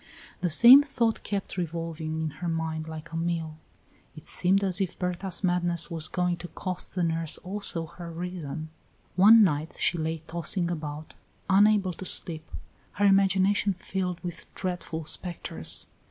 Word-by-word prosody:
The 180 - 0
same 240 - +9
thought 240 -6 -1
kept 200 -2 -4
revolving 165 -2 -3
in 155 - -1
her 175 - -2
mind 160 -1 -2
like 160 +1 -8
a - - -6
mill. 165 -2 -2 0.6
It - - -13
seemed 195 +3 +2
as 190 0 +1
if 185 -2 -2
Berta's 180 +1 -2
madness 175 -1 0
was 160 -2 -1
going 180 0 -1
to 175 - -8
cost 185 +3 -6
the 180 - 0
nurse 165 -1 0
also 185 -3 -1
her 170 +1 -10
reason. 165 -3 -6 0.5
One 215 +4 +8
night 155 -3 0
she 175 - +1
lay 160 +1 -2
tossing 170 +2 -1
about, 155 -2 -6 0.4
unable 200 -1 +4
to 185 - -9
sleep, 160 -3 -2 0.4
her 205 - +1
imagination 195 +1 +3
filled 180 -1 -3
with 175 -2 -7
dreadful 175 -3 -4
spectres. 155 - -1
175 Hz, 155 wpm, -27 LUFS, 160-190 Hz, 0.6 s, same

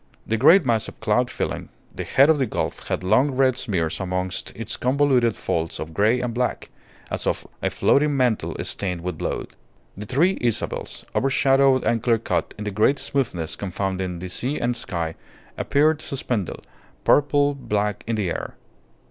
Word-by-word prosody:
The 115 - 0
great 160 - +6
mass 115 -3 +1
of - - -11
cloud 125 +4 +1
filling - - -3 0.3
the - - -3
head 135 +2 +5
of 155 - +1
the 130 - +1
gulf - - -3
had - - -2
long 110 +10 +4
red 130 -1 +2
smears 95 -11 -2
amongst 90 -1 -3
its - - -4
convoluted 130 -3 +2
folds 80 -1 -2
of 80 +1 -6
grey 110 +7 +3
and 125 -2 -2
black, 125 +1 -2 0.4
as - - -2
of - - -1 0.2
a - - +1
floating 145 0 +2
mantle 125 -4 +1
stained 90 -4 -3
with 90 -2 -4
blood. - - -3 0.5
The 105 +2 -7
three 170 - +2
Isabels, 120 -3 -2
overshadowed 135 0 +3
and 115 -1 +1
clear 115 -1 +3
cut 110 - -2
in 105 - -6
a - - -1
great 110 +8 +3
smoothness 100 - -2
confounding 95 -2 -3
the 90 +2 -6
sea 130 +10 -3
and 120 0 0
sky, 85 -7 -3 0.4
appeared 155 +2 +2
suspended, 120 - -3 0.4
purple 145 0 +4
black, 105 -6 -2
in 115 - 0
the 100 -5 -1
air. - - -5
115 Hz, 170 wpm, -23 LUFS, 95-135 Hz, 0.5 s, great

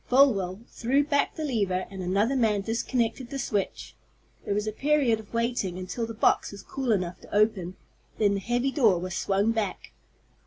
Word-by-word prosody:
Folwell 215 -8 +3
threw 265 +5 +1
back 285 -1 +1
the 315 - -3
lever, 200 -9 0
and 190 -1 -6
another 200 +8 +1
man 220 -5 +2
disconnected 235 +2 -1
the 275 - -4
switch. 205 -7 -3 0.5
There - - -1
was 210 0 0
a 215 - -1
period 270 -2 +2
of 215 - -13
waiting 230 -6 -1
until 185 +5 -4
the 225 - -7
box - - +2
was 200 -1 -10
cool 265 -3 -2
enough 180 -4 -1
to - - -15
open. 200 -4 +2 0.4
Then 205 -2 +3
the 200 - -1
heavy 240 +6 0
door 225 - +4
was 180 +1 -4
swung 200 +4 +1
back. 220 -4 -3
220 Hz, 185 wpm, -27 LUFS, 195-245 Hz, 0.5 s, door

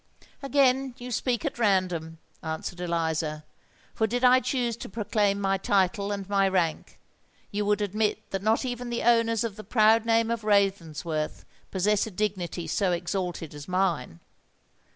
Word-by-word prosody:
"Again 270 -2 +2
you 250 +1 -7
speak 240 -1 -1
at - - -3
random," 180 -6 +1 0.2
answered 160 +2 -5
Eliza; 160 -3 -1 0.5
"for 220 - +1
did 245 +3 -2
I 255 0 +7
choose 245 -2 -1
to - - -8
proclaim 205 -1 0
my 195 -1 +1
title 200 +1 +1
and 200 -2 -4
my 200 -1 +3
rank, 180 -4 -1 0.5
you 205 0 -1
would 210 0 +2
admit 210 +1 -1
that 195 - -2
not 220 +5 +1
even 245 -1 -4
the 235 - -2
owners 230 -2 +3
of 225 -4 -4
the 215 - -8
proud 220 +1 +4
name 230 0 +2
of 230 -2 -2
Ravensworth 170 -7 0 0.2
possess 205 +3 +1
a - - -5
dignity 185 -4 -3
so 185 +4 0
exalted 175 -2 -3
as 145 0 -9
mine. 175 - -1
200 Hz, 155 wpm, -27 LUFS, 180-230 Hz, 0.5 s, I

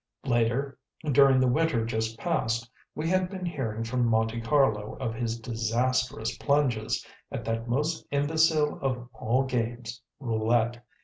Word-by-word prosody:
Later, 120 +2 +1 0.3
during 135 -1 +6
the 130 - +3
winter 125 -3 +2
just 110 0 -2
past, 115 -7 -1 0.3
we 155 +2 -2
had 185 +1 +2
been 185 -2 -5
hearing 120 -10 -3
from 120 +1 0
Monte 115 0 +1
Carlo 115 -4 +2
of 125 -4 -2
his 115 0 -2
disastrous 115 +1 0
plunges 135 -7 +1 0.3
at - - -5
that 115 +1 -2
most 150 +6 -1
imbecile 155 +1 +2
of 125 -3 -2
all 125 +3 +1
games, 120 -2 -3 0.2
roulette. 120 0 0
120 Hz, 135 wpm, -28 LUFS, 115-140 Hz, 0.3 s, during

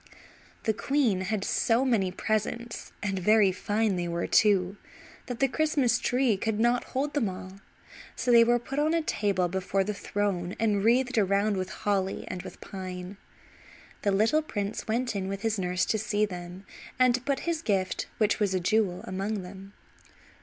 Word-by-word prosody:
The 220 - +1
queen 240 -5 +1
had 195 +1 -2
so 235 +5 +2
many 210 -8 +2
presents, 220 +4 -3
and 195 -2 -1
very 210 +1 +4
fine 205 +1 0
they 175 -1 -2
were, 170 0 -2
too, 195 -2 +3 0.5
that 245 -1 -5
the 270 - +4
Christmas 275 -4 +1
Tree 245 -4 +1
could 220 +1 -2
not 240 +2 +2
hold 285 +3 0
them 235 -9 +1
all, 185 +1 -9 0.6
so 250 - 0
they 235 -1 +8
were 240 +1 +3
put 265 +4 -4
on 310 +2 +2
a 330 - +1
table 195 - 0
before 190 +2 -1
the 210 +2 -3
throne 195 -3 -2
and 210 -3 +1
wreathed 245 +1 +3
around 200 +1 +2
with 185 -1 -3
holly 195 -2 -1
and 185 - -4
with - - -11
pine. 185 0 -7 0.8
The 200 - +1
little 220 +10 +3
prince 205 -8 -4
went 240 +1 -1
in 190 -1 -2
with 195 +2 -5
his 220 -2 0
nurse 180 -1 0
to 220 - 0
see 210 0 +1
them, 180 0 -8 0.3
and 255 -1 +5
to 250 - -1
put 275 +1 -1
his 335 -2 -2
gift, 195 - -1
which 215 -1 +2
was 200 -3 +1
a - - +2
jewel, 190 -1 +1
among 195 +2 -3
them. 195 +2 -11
205 Hz, 180 wpm, -28 LUFS, 190-235 Hz, 0.8 s, they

